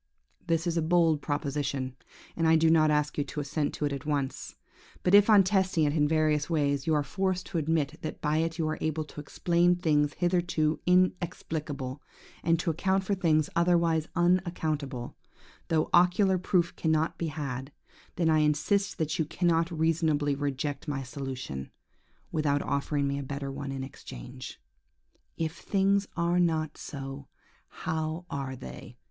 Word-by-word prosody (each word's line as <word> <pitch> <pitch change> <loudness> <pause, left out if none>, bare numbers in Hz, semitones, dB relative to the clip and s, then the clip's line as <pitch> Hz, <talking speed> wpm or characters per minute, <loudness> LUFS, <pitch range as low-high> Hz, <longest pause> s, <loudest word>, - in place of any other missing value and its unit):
"This 165 0 +1
is 170 -1 0
a - - +2
bold 165 -2 +3
proposition, 140 -3 -2 0.4
and 165 -1 +1
I 160 - +6
do 160 0 +4
not 155 -1 +5
ask 150 0 +1
you - - +2
to 150 - -6
assent 145 +1 -1
to 150 - -2
it 145 - -1
at 140 -1 -5
once. 145 -3 -3 0.5
But 180 - +2
if 205 +1 +7
on 205 -3 +8
testing 190 -4 +2
it 145 -1 +2
in 150 -2 +3
various 155 -1 +1
ways, 140 -3 0
you 160 - +3
are 150 - +2
forced 185 +2 -1
to 170 - -2
admit 160 -1 0
that 155 - -5
by 150 0 0
it 165 +1 -1
you 160 -2 0
are 155 - -2
able 155 0 -1
to 150 0 -9
explain 175 +3 +2
things 150 -4 +1
hitherto 175 -3 +1
inexplicable, 160 -6 0 0.4
and 165 0 +3
to 170 -1 0
account 190 +4 +1
for 200 - -1
things 160 -5 +2
otherwise 170 -2 +2
unaccountable, 160 -8 0 0.5
though 160 -1 +1
ocular 180 +2 +4
proof 175 -2 +1
cannot 160 0 0
be 170 - -1
had, 140 -3 -5 0.4
then 170 -1 +1
I 155 -1 +4
insist 155 +7 +1
that 155 0 -1
you 160 - +2
cannot 165 +1 +1
reasonably 160 -3 +1
reject 145 +1 -3
my 140 -2 -2
solution, 130 - -6 0.6
without 145 -2 +1
offering 140 0 0
me 140 0 -1
a - - -4
better 140 0 -4
one 140 0 -5
in 135 -1 -4
exchange. 60 - -9 0.8
If 165 0 -2
things 200 0 +1
are 170 +1 +2
not 160 -3 +1
so, 135 -1 -7 0.4
how 160 +2 -3
are 135 -2 -3
they? 125 -1 -10
155 Hz, 165 wpm, -29 LUFS, 145-170 Hz, 0.8 s, on